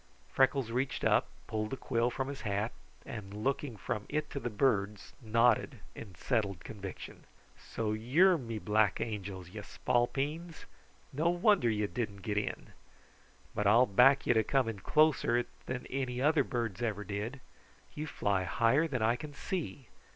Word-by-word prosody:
Freckles 135 -3 +2
reached 130 +3 -1
up, - - +3 0.2
pulled 110 0 -2
the 135 - -4
quill 115 0 0
from 130 +2 -3
his 140 -1 -6
hat, 105 +1 -1 0.3
and 105 -3 -7
looking 135 -2 -1
from 105 +1 -4
it 155 0 -2
to 140 - -3
the 120 - -3
birds, 105 -3 0
nodded 115 0 +2
in 100 -5 -10
settled 100 -8 -1
conviction. 100 -3 -8 0.3
"So 110 -2 -3
you're 145 - +4
me 115 -3 -5
black 105 -1 +2
angels, 100 -5 -5
ye 105 - -7
spalpeens! 140 +10 -1 0.5
No 155 +5 +2
wonder 175 - +3
you 105 -1 0
didn't 105 -3 -4
get 105 0 -2
in! 105 - -5 0.8
But 105 - 0
I'll 115 +5 +6
back 125 +6 +5
you - - +4
to 110 -1 +3
come 130 -4 +1
closer 150 -3 +3
it 120 - -1 0.2
than 130 -1 -4
any 130 -2 -3
other 150 +3 +3
birds 115 -6 -3
ever 105 -3 -1
did. 105 +7 -4 0.5
You 155 +1 -5
fly 100 -8 0
higher 115 - +3
than 125 -7 -2
I 115 +2 +3
can 145 +3 -8
see. 150 - -4
120 Hz, 160 wpm, -32 LUFS, 105-135 Hz, 0.8 s, I'll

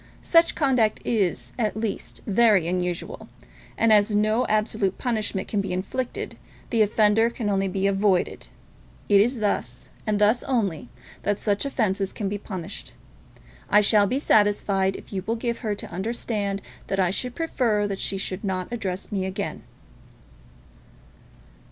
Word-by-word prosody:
Such 335 0 +4
conduct 255 -8 +2
is, 175 - 0
at 215 -2 0
least, 220 -2 -4
very 210 -4 +4
unusual; 180 -1 -3 0.5
and 225 -1 +4
as 210 0 +4
no 215 +3 +2
absolute 215 -2 0
punishment 215 -6 -1
can 205 - 0
be 195 - -4
inflicted, 195 +7 -3 0.3
the 230 - +3
offender 215 +2 +4
can 230 -3 -3
only 195 0 +1
be 190 +1 -1
avoided. 195 -2 +1 0.6
It 200 -1 +6
is 240 +2 +1
thus, 125 - -2 0.2
and 210 -1 +2
thus 210 +4 +3
only, 200 - -1 0.3
that 205 0 0
such 205 +1 0
offences 200 -8 -1
can 200 -3 -3
be 205 +1 -3
punished. 185 -4 -7 0.8
I 210 - +6
shall 205 0 +4
be 255 - 0
satisfied 200 -6 +2
if - - -11
you 190 -1 -2
will 225 - +1
give 235 0 -2
her 215 -4 -2
to - - -8
understand 200 0 -2 0.2
that 195 - -1
I 185 -1 +3
should 250 +5 -2
prefer 235 -10 0
that 195 -1 -3
she 195 - 0
should 190 0 -3
not 185 -1 -2
address 195 -5 -4
me 190 -2 -1
again." 190 - -4
205 Hz, 150 wpm, -25 LUFS, 195-225 Hz, 0.8 s, It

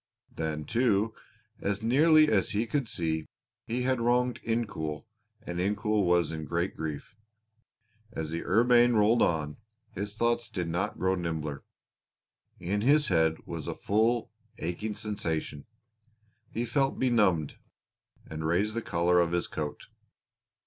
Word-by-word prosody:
Then, 80 -1 -3
too, 110 -2 +1 0.5
as 100 +1 -2
nearly 155 +6 +5
as 105 -8 +2
he 105 +3 +1
could 130 0 -2
see, 80 -2 -2 0.4
he 120 +2 -1
had 130 -1 +1
wronged 125 +1 +1
Incoul 105 -10 -3 0.4
and 85 -4 -5
Incoul 105 +2 +1
was 85 -2 +2
in 80 -1 -5
great 85 +4 -2
grief. 80 - -6 1.0
As 80 -7 -4
the 85 - -3
Urbaine 120 +3 +4
rolled 110 +2 +4
on, 75 -3 0 0.3
his 100 +2 -5
thoughts 120 +1 0
did 90 -3 -3
not 90 +5 -2
grow 95 +3 +1
nimbler. 80 -6 -3 1.0
In 100 +4 -1
his 145 +5 +4
head 80 -3 +1
was 85 -3 -6
a - - -3
full, 115 +3 +1 0.3
aching 100 +6 -3
sensation; 85 -8 -4 0.8
he 115 +2 -2
felt 135 +3 0
benumbed, 105 - +2 0.7
and 80 0 -6
raised 90 +7 +1
the 115 - -2
collar 90 -3 +2
of 85 0 +1
his 85 - +1
coat. 75 -1 -5
100 Hz, 135 wpm, -29 LUFS, 80-115 Hz, 1.0 s, nearly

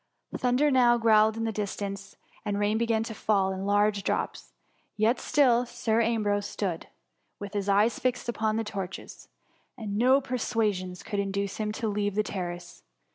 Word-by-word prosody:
Thunder 255 +4 +2
now 245 -2 +5
growled 220 -1 +4
in 225 - -2
the 225 - -1
distance, 200 -1 -5 0.3
and 205 -1 -2
rain 205 +2 +1
began 225 -1 +1
to 225 - -6
fall 200 -3 +1
in 190 +1 -4
large 205 0 +2
drops; 190 - -3 0.5
yet 220 +4 +2
still 250 -5 +3
Sir 235 -2 0
Ambrose 210 -3 0
stood, 180 -5 -3 0.5
with 200 0 -8
his 200 -1 -2
eyes 210 +4 +3
fixed 250 -1 -1
upon 220 -2 0
the 225 - 0
torches, 195 -3 -7 0.5
and 210 -3 -4
no 260 +3 +5
persuasions 215 -8 -2
could 205 - -3
induce 200 0 -2
him 215 -1 -2
to 225 0 -3
leave 205 -1 -1
the 215 - +2
ter 190 -4 -3
race. 175 0 -10
215 Hz, 170 wpm, -27 LUFS, 200-230 Hz, 0.5 s, now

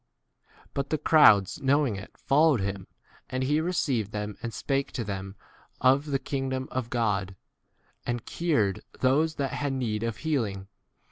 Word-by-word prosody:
But 140 0 -2
the 155 - +1
crowds 145 - +5
knowing 135 -4 +2
[it] 95 - -10
followed 145 -1 +3
him; 100 -1 -3 0.4
and 130 0 -2
he 150 +4 +2
received 140 - 0
them 105 -1 -4
and 115 - -4
spake 135 +3 -1
to 120 - -2
them 95 -1 -5 0.4
of 135 +3 +3
the 140 -2 +1
kingdom 130 -1 -3
of 125 -2 -3
God, 100 -6 0 0.7
and 120 -1 -3
cured 115 - 0 0.2
those 150 +5 +3
that 140 -3 -2
had 145 -2 -1
need 115 -5 -2
of 115 -2 -2
healing. 110 -11 -2
130 Hz, 150 wpm, -27 LUFS, 105-140 Hz, 0.7 s, crowds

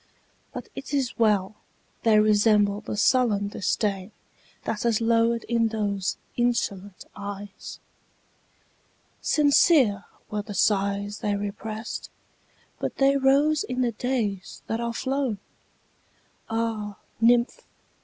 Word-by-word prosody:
But - - -7
't 285 +1 -3
is 260 -3 -1
well!—they 215 +1 0
resemble 210 -1 +3
the 210 - -5
sullen 210 -5 +2
disdainThat 200 -1 -1 0.7
has 230 -3 +2
lowered 230 0 +2
in 230 -1 +1
those 205 -3 -2 0.2
insolent 205 -5 -1
eyes. 200 0 -8 1.4
Sincere 285 - +4 0.3
were 210 0 -1
the 205 0 -8
sighs 200 +1 +1
they 205 -1 -1
represt, 215 +2 -5 0.7
But - - -3
they 275 0 +4
rose 280 +3 +3
in 250 0 -3
the 240 - +1
days 215 -5 -3
that 225 +1 -2
are 235 0 -1
flown! 260 -2 -1 1.1
Ah, 225 -3 -2 0.2
nymph! 240 - +3
220 Hz, 105 wpm, -25 LUFS, 205-240 Hz, 1.4 s, Sincere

